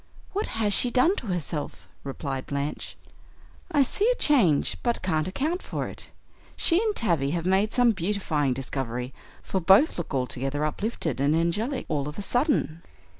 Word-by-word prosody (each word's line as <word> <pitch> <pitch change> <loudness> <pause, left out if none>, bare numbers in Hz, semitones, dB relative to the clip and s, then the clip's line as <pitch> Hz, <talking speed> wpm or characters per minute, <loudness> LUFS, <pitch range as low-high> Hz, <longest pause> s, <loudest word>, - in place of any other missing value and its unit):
"What 410 +2 -1
has 210 -2 +1
she 245 - +2
done 265 +10 +3
to 230 - -5
herself?" 170 -4 -4 0.2
replied 135 -1 -5
Blanche. 140 +1 -4 0.7
"I 290 -4 +4
see 410 - +1
a - - +3
change, 225 - +3
but 235 -1 -1
can't 160 -3 0
account 305 - -2
for - - -4
it. - - -9 0.5
She 340 +3 +2
and 435 -2 0
Tavie 165 - +1
have 165 - -4
made 195 +3 +2
some 245 -2 +4
beautifying 170 - 0
discovery, 125 -1 -4 0.3
for 190 - -1
both 195 - +5
look 175 - -5
altogether 135 +3 -1
uplifted 160 - -2
and 145 +3 +3
angelic 205 - 0
all 145 -2 -1
of 150 - -7
a 205 - -3
sudden." 240 - 0
180 Hz, 165 wpm, -26 LUFS, 145-240 Hz, 0.7 s, both